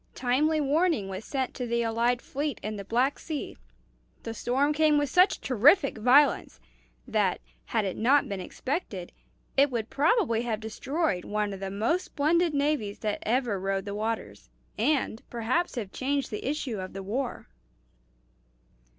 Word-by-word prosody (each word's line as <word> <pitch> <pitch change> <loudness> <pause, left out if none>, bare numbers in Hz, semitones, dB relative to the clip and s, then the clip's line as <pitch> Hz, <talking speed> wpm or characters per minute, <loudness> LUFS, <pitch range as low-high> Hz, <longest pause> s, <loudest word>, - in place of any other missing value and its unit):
Timely 295 +5 +2
warning 295 - +1
was 190 +2 -5
sent 265 0 -2
to 250 -2 -4
the 235 0 0
allied 235 +2 +1
fleet 285 -2 -3
in 215 +1 -3
the 200 - -6
Black 245 +7 +1
Sea. 310 -3 -5 0.7
The 225 - -4
storm 270 +6 +1
came 305 0 +4
with 290 -2 0
such 365 +2 +4
terrific 275 - +4
violence 265 - +4 0.5
that, - - +1 0.3
had 205 - 0
it 190 - -2
not 270 +6 +3
been 200 -1 -4
expected, 195 - -4 0.4
it 280 +1 +5
would 235 -3 -3
probably 290 - +2
have 230 -3 -2
destroyed 225 - -2
one 210 -1 -2
of 195 - -7
the 195 0 -4
most 225 - 0
splendid 325 +2 +1
navies 280 -8 0
that 210 -2 -1
ever 235 -3 0
rode 195 0 -2
the 200 - -4
waters, 205 - -4 0.3
and 250 -1 0
perhaps 250 +10 -1
have 210 -6 -4
changed 275 0 -1
the 210 +5 -3
issue 270 -7 -3
of 185 0 -6
the 195 0 -6
war." 240 +6 -3
245 Hz, 160 wpm, -28 LUFS, 210-290 Hz, 0.7 s, it